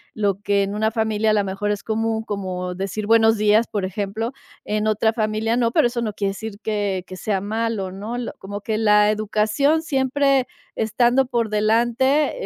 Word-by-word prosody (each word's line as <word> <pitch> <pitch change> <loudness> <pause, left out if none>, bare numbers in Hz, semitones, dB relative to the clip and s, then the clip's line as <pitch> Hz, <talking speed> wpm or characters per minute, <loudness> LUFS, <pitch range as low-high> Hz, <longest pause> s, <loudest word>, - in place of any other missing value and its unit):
lo 200 -3 0
que 200 -1 +2
en 200 +1 -3
una 220 +1 +1
familia, 220 -1 +1
a - - +3
lo 210 -1 +2
mejor, 195 +2 -2
es 205 - -3
común, 225 0 -1
como 185 -4 -4
decir: 195 +3 -4
"Buenos 225 0 +5
días", 215 +2 +3
por 205 -2 -3
ejemplo, 205 +4 -3 0.3
en 210 0 -1
otra 215 +1 +2
familia 220 0 -1
no, 235 -2 +2
pero 240 - +4
eso 240 0 -3
no 215 -3 -2
quiere 200 -1 -1
decir 205 +1 -7
que 205 -4 -1
que 185 - -8
sea 195 -1 -1
malo, 215 -2 -2
¿no?, 205 +5 -6
l 245 -1 -4
como 205 +1 -7
que 215 +1 -2
la 210 -1 +4
educación 215 +8 +1
siempre 275 -3 +1 0.3
estando 240 +4 +2
por 235 -3 -1
delante, 235 +7 +2
215 Hz, 190 wpm, -22 LUFS, 205-230 Hz, 0.3 s, Buenos